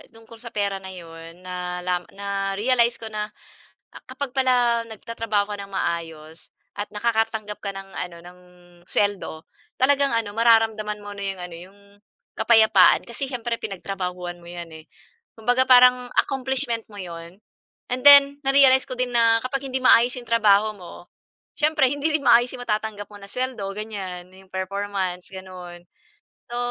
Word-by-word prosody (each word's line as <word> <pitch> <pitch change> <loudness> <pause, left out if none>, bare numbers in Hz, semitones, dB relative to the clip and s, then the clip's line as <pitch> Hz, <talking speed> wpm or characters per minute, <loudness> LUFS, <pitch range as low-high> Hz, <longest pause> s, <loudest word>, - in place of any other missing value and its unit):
tungkol 225 0 -15
sa 235 - -10
pera 200 -1 -1
na 190 - -11
'yon, 165 -1 -11
na 180 -1 -5
la 180 0 0 0.2
na-realized 200 +5 0
ko 225 -2 -9
na, 210 0 -3 0.6
ah, - - -13
kapag 260 0 -5
pala 245 -3 +2
nagtatrabaho 220 -2 -3
ka 205 - -4
ng 200 0 -9
maayos 165 -2 -4 0.3
at 205 - -2
nakakatanggap 220 -2 -1
ka 200 - -2
ng 195 0 -9
ano 175 -2 -6
ng 180 +1 -14 0.5
suweldo, 200 -6 -1 0.4
talagang 280 +1 +3
ano 225 -3 -1
mararamdaman 225 -2 +2
mo 205 - -8
na 200 - -6
'yong 190 -2 -5
ano, 175 -1 -8
'yong 185 +4 -13 0.6
kapayapaan 220 -3 +5
kasi 240 +4 -4
siyempre 240 -3 -3
pinagtrabahuhan 180 -3 -5
mo 170 - -15
yan, 175 -1 -8
eh, 160 0 -12 0.5
kumbaga 245 +3 +2
parang 250 0 +6
accomplishment 265 -3 -1
mo 205 - -13
'yon, 170 +1 -9 0.5
and 255 +1 -1
then 280 0 +8
na-realized 270 -1 +5
ko 255 - -5
din 250 0 -2
na 230 -1 +4
kapag 270 +2 -3
hindi 260 - -1
maayos 245 0 +6
'yong 245 -2 -9
trabaho 215 -2 +4
mo, 175 -2 -12 0.5
siyempre 305 -3 +3
hindi 290 +2 -1
rin 300 - -1
maayos 240 +1 +6
yung 245 - -8
matatanggap 210 -1 -2
mo 205 - -11
na 200 - -12
suweldo 255 -3 -3
ganyan, 190 -4 -7
'yong 190 0 -17
performance 190 -1 -3
gano'n. 180 -2 -10 0.7
So, 240 - -5
210 Hz, 155 wpm, -23 LUFS, 185-245 Hz, 0.7 s, then